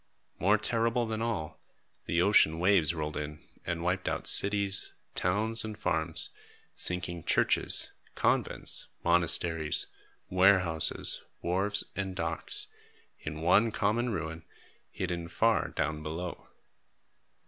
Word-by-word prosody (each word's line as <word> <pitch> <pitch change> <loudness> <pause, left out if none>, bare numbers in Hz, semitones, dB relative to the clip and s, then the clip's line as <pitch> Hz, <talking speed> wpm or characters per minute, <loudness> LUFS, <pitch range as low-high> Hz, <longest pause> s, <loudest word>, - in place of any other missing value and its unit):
More 105 +4 +3
terrible 115 +2 0
than 110 0 -4
all, 110 -10 -4 0.5
the 85 +1 +1
ocean 90 -5 +4
waves 85 -3 +2
rolled 75 -1 -4
in 75 0 -6 0.3
and 85 -1 -3
wiped 90 +1 -1
out - - -4
cities, 100 -1 +4 0.2
towns, 110 +5 -1
and 110 -1 -7
farms, 80 -3 -1 0.4
sinking 85 -2 -1
churches, - - +3 0.2
convents, - - -1 0.2
monasteries, 85 -2 +1 0.4
warehouses, 90 -4 +5 0.2
wharves, 100 +4 +2
and 95 -1 -4
docks, 80 -2 -2 0.5
in 75 +1 -7
one 95 +7 +3
common 110 +4 -1
ruin, 80 -3 -5 0.5
hidden 85 -2 -5
far 115 +5 +1
down 75 -1 -3
below. 80 +3 -7
90 Hz, 110 wpm, -29 LUFS, 80-105 Hz, 0.5 s, warehouses